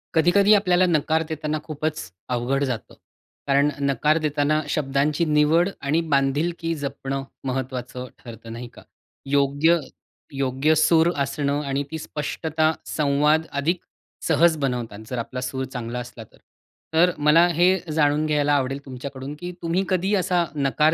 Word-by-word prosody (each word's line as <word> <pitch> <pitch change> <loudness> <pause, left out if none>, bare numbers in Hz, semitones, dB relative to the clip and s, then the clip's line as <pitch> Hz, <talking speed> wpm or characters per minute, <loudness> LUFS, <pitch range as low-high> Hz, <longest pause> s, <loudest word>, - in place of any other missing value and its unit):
कधी-कधी 195 +6 +5
आपल्याला 185 -3 +4
नकार 160 -1 +1
देताना 155 -1 -2
खूपच 155 0 -3 0.3
अवघड 130 +3 0
जातं. 125 -5 -4 0.5
कारण 140 +1 +3 0.2
नकार 150 +4 +2
देताना 150 -1 +1
शब्दांची 145 +2 0
निवड 155 +4 +3
आणि 150 +4 +1
बांधिलकी 155 +5 +1
जपणं 135 -2 -4 0.2
महत्त्वाचं 125 -1 -4
ठरतं, 115 -1 -10
नाही 120 +1 -7
का? - - -14 0.4
योग्य, 145 +4 +3 0.5
योग्य 135 +3 +1
सूर 160 +2 +4
असणं 140 +1 -1
आणि 140 +1 -1
ती 160 - -3
स्पष्टता 155 +1 -1
संवाद 150 +2 +2 0.2
अधिक 170 +4 0 0.5
सहज 165 +1 +4
बनवतात, 125 -7 -3
जर 125 - -3
आपला 125 +2 -5
सूर 130 +1 -3
चांगला 125 -2 -5
असला 120 -1 -8
तर. - - -22 0.6
तर 175 +3 +5
मला 150 +4 +5
हे 175 +2 +3 0.2
जाणून 150 0 +2
घ्यायला 145 -1 +2
आवडेल 135 0 -1
तुमच्याकडून 135 +1 -7
की 180 0 -5
तुम्ही 170 +3 0
कधी 190 +2 +1
असा 180 -2 +1
नकार 150 +2 +2
150 Hz, 140 wpm, -23 LUFS, 135-160 Hz, 0.6 s, कधी-कधी